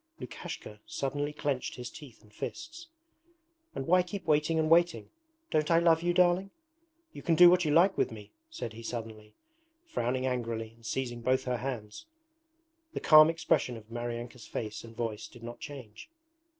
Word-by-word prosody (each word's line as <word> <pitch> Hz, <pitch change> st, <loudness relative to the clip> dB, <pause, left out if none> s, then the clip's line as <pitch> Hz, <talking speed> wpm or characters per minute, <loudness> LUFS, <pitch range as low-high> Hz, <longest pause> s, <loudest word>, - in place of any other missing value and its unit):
Lukashka 105 Hz, 0 st, -8 dB
suddenly 145 Hz, +2 st, -2 dB
clenched 145 Hz, -3 st, -2 dB
his 125 Hz, -1 st, -7 dB
teeth 135 Hz, -6 st, -13 dB
and 105 Hz, -1 st, -21 dB
fists. 330 Hz, -, -7 dB, 0.9 s
'And 135 Hz, -, -3 dB
why 180 Hz, +4 st, +5 dB
keep 180 Hz, +1 st, -6 dB
waiting 155 Hz, +1 st, +2 dB
and 160 Hz, -1 st, +2 dB
waiting? 170 Hz, +2 st, +3 dB, 0.4 s
Don't 155 Hz, -1 st, +1 dB
I 165 Hz, -, +5 dB
love 165 Hz, -1 st, +4 dB
you, 175 Hz, +1 st, +1 dB
darling? 180 Hz, +2 st, +3 dB, 0.6 s
You -, -, -9 dB
can 165 Hz, -, +2 dB
do 175 Hz, +1 st, +9 dB
what 180 Hz, -1 st, +3 dB
you 150 Hz, -, +1 dB
like 180 Hz, +5 st, +5 dB
with -, -, +2 dB
me,' 105 Hz, -2 st, -10 dB, 0.2 s
said 120 Hz, -, -6 dB
he 115 Hz, -, -9 dB
suddenly, 110 Hz, -2 st, -7 dB, 0.5 s
frowning 130 Hz, -, -1 dB
angrily 115 Hz, -3 st, -2 dB
and 115 Hz, 0 st, -23 dB
seizing 120 Hz, 0 st, -3 dB
both 130 Hz, +2 st, +1 dB
her 125 Hz, -1 st, -1 dB
hands. 120 Hz, -, -6 dB, 0.9 s
The -, -, -2 dB
calm 155 Hz, 0 st, +8 dB
expression 160 Hz, -6 st, 0 dB
of 110 Hz, 0 st, -15 dB
Maryanka's 120 Hz, 0 st, -5 dB
face 110 Hz, -1 st, -5 dB
and 115 Hz, -1 st, -12 dB
voice 115 Hz, -3 st, -3 dB
did 120 Hz, -, -15 dB
not 120 Hz, 0 st, -7 dB
change. 125 Hz, -, -10 dB
130 Hz, 170 wpm, -30 LUFS, 115-165 Hz, 0.9 s, do